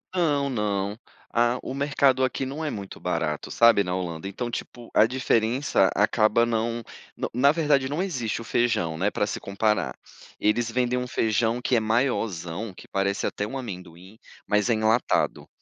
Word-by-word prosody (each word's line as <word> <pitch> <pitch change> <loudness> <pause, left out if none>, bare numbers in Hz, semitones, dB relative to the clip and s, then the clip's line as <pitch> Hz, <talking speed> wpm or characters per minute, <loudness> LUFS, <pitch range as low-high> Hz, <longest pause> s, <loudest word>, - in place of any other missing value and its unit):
Não, 145 -6 +1
não, 105 -4 -1 0.3
a 120 +1 +2
o 130 - -5
mercado 140 -2 +2
aqui 130 +1 -1
não 140 +5 -5
é 150 - -2
muito 100 -2 -7
barato, 80 -4 -2
sabe, 115 -3 +5
na 90 -1 -3
Holanda, 85 -1 -4
então, 120 +5 -4
tipo, 120 0 -7
a 105 - +7
diferença 120 -2 +2
acaba 110 +2 +3
não 115 0 -1 0.3
no - - -3
na 135 +4 +5
verdade, 145 -4 +2
não 150 +5 -1
existe 125 - -2
o - - -7
feijão, 110 -10 0
né, 100 +5 +1
pra 105 - 0
se - - -4
comparar. 100 -9 -1 0.4
Eles 115 +2 +1
vendem 125 +1 +1
um 125 0 -2
feijão 115 0 0
que 125 - +1
é - - +4
maiorzão, 110 -5 -1
que - - -14
parece 100 0 -1
até 105 - -3
um 130 +6 -5
amendoim, 95 -4 -9 0.3
mas 105 +3 +2
é - - +4
enlatado. 110 +2 +1
115 Hz, 175 wpm, -25 LUFS, 100-125 Hz, 0.4 s, a